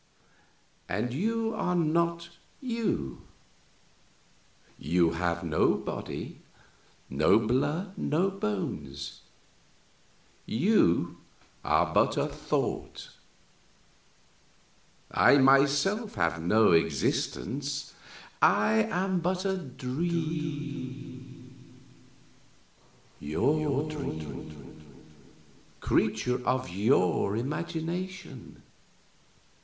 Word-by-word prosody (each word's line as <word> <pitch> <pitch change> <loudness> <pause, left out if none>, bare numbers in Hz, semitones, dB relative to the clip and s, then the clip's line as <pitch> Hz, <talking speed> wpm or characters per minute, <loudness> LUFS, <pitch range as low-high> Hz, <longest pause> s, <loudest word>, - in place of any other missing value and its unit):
_" - - -10
"I!" - - +1
"And 120 +3 -2
you 225 - 0
are 180 -5 -1
not 170 +1 +1 0.3
you 230 - -2 1.6
you 85 -1 +2
have 85 0 -1
no - - +2
body, - - -6 0.7
no 75 +8 +4
blood, 145 - 0
no 180 +6 +1
bones, 70 - -4 1.3
you 115 - +2 0.5
are - - +2
but - - +3
a - - +2
thought. - - -3 2.0
I 140 - +6
myself 140 - +3
have 85 -3 0
no 105 +5 +4
existence; 135 - 0 0.5
I 105 +1 +4
am 185 +1 0
but 180 +2 -1
a 190 -1 +1
dream 140 -4 -5 1.4
your 145 - 0
dream, 80 - -7 1.0
creature 125 0 +1
of 125 -5 0
your 100 -1 +2
imagination. 170 +7 -5
135 Hz, 75 wpm, -29 LUFS, -, 2.0 s, I